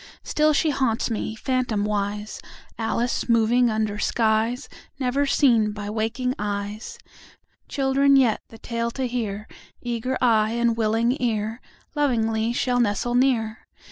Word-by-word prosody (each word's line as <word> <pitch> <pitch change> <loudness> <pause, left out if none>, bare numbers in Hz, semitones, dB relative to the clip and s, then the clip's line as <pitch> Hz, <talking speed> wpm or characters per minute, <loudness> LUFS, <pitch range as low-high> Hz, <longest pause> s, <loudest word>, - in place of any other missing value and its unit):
Still 305 0 +2
she 305 +1 +2
haunts 255 -4 0
me, 220 0 -3
phantomwise, 210 -4 -2 0.4
Alice 235 +2 -1
moving 235 +2 +4
under 215 -1 -1
skies 225 +4 +1 0.3
Never 275 +2 0
seen 230 -7 +3
by 205 0 -5
waking 225 +4 -1
eyes. 205 - -4 0.7
Children 275 0 +3
yet, 250 -5 +3
the 225 - -12
tale 230 +1 -3
to 260 +2 -3
hear, 220 -4 -3 0.3
Eager 240 +2 -2
eye 220 -3 +3
and 235 -1 +1
willing 225 +2 +1
ear, 225 -1 -1 0.3
Lovingly 225 -6 +1
shall 245 +1 0
nestle 235 +1 0
near. 245 -4 +1
230 Hz, 125 wpm, -24 LUFS, 215-250 Hz, 0.7 s, moving